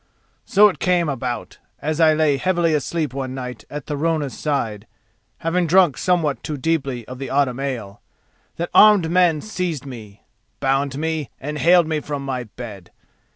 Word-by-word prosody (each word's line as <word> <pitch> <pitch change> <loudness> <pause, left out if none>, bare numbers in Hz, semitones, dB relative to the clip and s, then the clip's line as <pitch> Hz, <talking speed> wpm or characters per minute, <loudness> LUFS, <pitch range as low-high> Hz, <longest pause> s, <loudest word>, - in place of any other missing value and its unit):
So 210 +2 +6
it 195 - -3
came 180 -2 +2
about, 125 -4 -4 0.2
as 155 +2 -2
I 160 -1 +5
lay 155 -3 +2
heavily 170 +1 +1
asleep 150 -1 -1
one 130 -1 -4
night 125 -3 -7
at 150 -2 -6
Thorunna's 150 -2 -1
side, 115 -8 -2 0.5
having 170 +1 0
drunk 175 -4 +5
somewhat 170 -6 0
too 150 - -4
deeply 135 -5 -2
of 130 0 -8
the 135 - -5
autumn 135 -2 +1
ale, 120 -8 -5 0.5
that 170 - -4
armed 205 -6 +6
men 175 -4 +3
seized 180 -9 -3
me, 110 -6 -10 0.4
bound 135 0 0
me, 160 -3 -2
and 150 +2 -5
haled 175 0 +5
me 155 -1 -1
from 145 -1 -5
my 130 -2 -3
bed. 105 -5 -10
145 Hz, 160 wpm, -21 LUFS, 130-165 Hz, 0.5 s, So